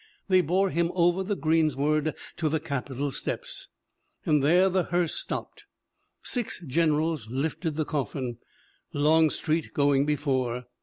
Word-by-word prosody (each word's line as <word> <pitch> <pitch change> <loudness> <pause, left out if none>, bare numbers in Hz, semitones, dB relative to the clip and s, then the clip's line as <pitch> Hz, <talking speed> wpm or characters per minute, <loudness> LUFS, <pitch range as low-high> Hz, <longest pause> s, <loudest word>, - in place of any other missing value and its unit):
They 185 -1 +6
bore 185 +4 +1
him 170 0 +1
over 175 +1 +3
the 205 +2 -1
greensward 155 -2 +1 0.2
to 160 -2 0
the 160 +1 0
Capitol 140 -2 -3
steps, - - -4 0.6
and 150 -2 +3
there 175 +7 +5
the 185 -1 +1
hearse 175 -1 0
stopped. - - -5 0.6
Six 245 -3 -2
generals 155 -3 +1
lifted 150 +5 -2
the 155 0 -1
coffin, 130 -5 -3 0.5
Longstreet 155 +1 +2
going 140 -1 +3
before. 130 -5 0
155 Hz, 125 wpm, -27 LUFS, 140-170 Hz, 0.6 s, They